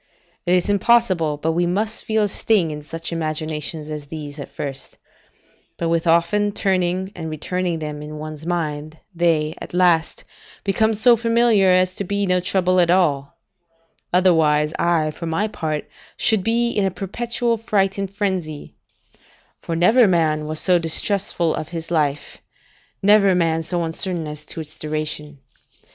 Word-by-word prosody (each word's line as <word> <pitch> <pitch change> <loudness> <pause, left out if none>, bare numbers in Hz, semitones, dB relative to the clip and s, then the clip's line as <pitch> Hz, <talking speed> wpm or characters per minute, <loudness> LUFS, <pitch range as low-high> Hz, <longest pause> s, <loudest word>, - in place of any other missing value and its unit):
It 180 - +4
is 180 - +1
impossible 200 -7 +2
but 160 +2 -1
we 175 +2 +1
must 210 +5 -1
feel 220 -1 +1
a - - +2
sting 195 -4 +1
in 150 0 -6
such 165 +3 -6
imaginations 155 -1 -3
as 150 -1 -6
these, 150 -1 -8
at 140 - -7
first; 135 -2 -7 0.8
but 170 - -1
with 165 0 0
often 170 +5 +2
turning 185 -1 0
and 160 -2 -5
returning 175 +3 -2
them 150 -2 -5
in 150 +1 -8
one's 155 0 -7
mind, 155 -2 -3 0.2
they, 165 -3 +1
at - - -7
last, 175 -3 +2 0.4
become 220 +3 +1
so 235 +3 +5
familiar 230 -3 +3
as 185 0 +3
to 200 - -3
be 200 +1 -1
no 180 -1 +2
trouble 185 0 +1
at 175 -1 +3
all: 170 -4 +1 0.7
otherwise, 160 -4 +3
I, 165 -3 +2
for 165 +2 -7
my 165 +7 0
part, 155 -7 -4 0.3
should 220 -5 +2
be 235 +2 +1
in 205 - 0
a 195 - +2
perpetual 230 +5 -2
fright 200 -3 0
and 195 -1 -2
frenzy; 185 -7 -3 0.9
for 165 - -3
never 220 +8 +5
man 155 -4 +1
was 155 0 -3
so 180 -2 +3
distrustful 170 0 0
of 155 - -4
his 165 -1 -6
life, 150 -3 -1 0.6
never 200 -2 +5
man 165 -2 +1
so 170 +1 -2
uncertain 165 +1 -3
as 150 0 -7
to 160 - -7
its 155 0 -11
duration. 155 -1 -4
170 Hz, 160 wpm, -21 LUFS, 155-195 Hz, 0.9 s, so